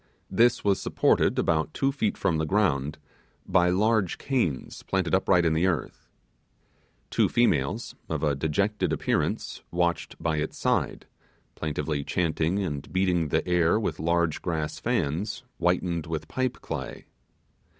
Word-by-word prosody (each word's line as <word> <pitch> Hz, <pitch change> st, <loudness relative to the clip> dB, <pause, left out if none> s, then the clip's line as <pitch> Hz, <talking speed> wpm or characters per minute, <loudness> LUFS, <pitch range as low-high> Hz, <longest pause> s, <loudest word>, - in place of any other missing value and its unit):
This 115 Hz, +5 st, +3 dB
was 100 Hz, -2 st, +2 dB
supported -, -, +2 dB
about 80 Hz, -1 st, +1 dB
two 135 Hz, 0 st, +1 dB
feet 125 Hz, -7 st, -1 dB
from 80 Hz, -4 st, +1 dB
the 80 Hz, -, 0 dB
ground, 75 Hz, -8 st, +1 dB, 0.5 s
by 90 Hz, 0 st, +3 dB
large 100 Hz, 0 st, +2 dB
canes 105 Hz, -, -2 dB
planted 95 Hz, -4 st, -1 dB
uprightly 95 Hz, -2 st, +4 dB
in 80 Hz, -, +3 dB
the 85 Hz, +4 st, +2 dB
earth. 85 Hz, -8 st, -3 dB, 1.0 s
Two -, -, +3 dB
females, -, -, +1 dB, 0.2 s
of 80 Hz, -1 st, -2 dB
a 75 Hz, -2 st, +2 dB
dejected 80 Hz, +9 st, 0 dB
appearance, -, -, -1 dB
watched 85 Hz, 0 st, -1 dB
by 80 Hz, -1 st, 0 dB
its 75 Hz, +1 st, -3 dB
side, -, -, 0 dB, 0.5 s
plaintively 75 Hz, -1 st, -2 dB
chanting 85 Hz, +2 st, 0 dB
and 75 Hz, -6 st, -4 dB
beating 90 Hz, -3 st, +1 dB
the 75 Hz, -, 0 dB
air 90 Hz, +2 st, +3 dB
with 110 Hz, -, -2 dB
large 85 Hz, 0 st, +1 dB
grass 80 Hz, -3 st, -2 dB
fans 105 Hz, -, -1 dB, 0.2 s
whitened 85 Hz, -2 st, 0 dB
with 80 Hz, -1 st, -4 dB
pipe 130 Hz, -1 st, -2 dB
clay. -, -, -6 dB
85 Hz, 140 wpm, -27 LUFS, 80-95 Hz, 1.0 s, uprightly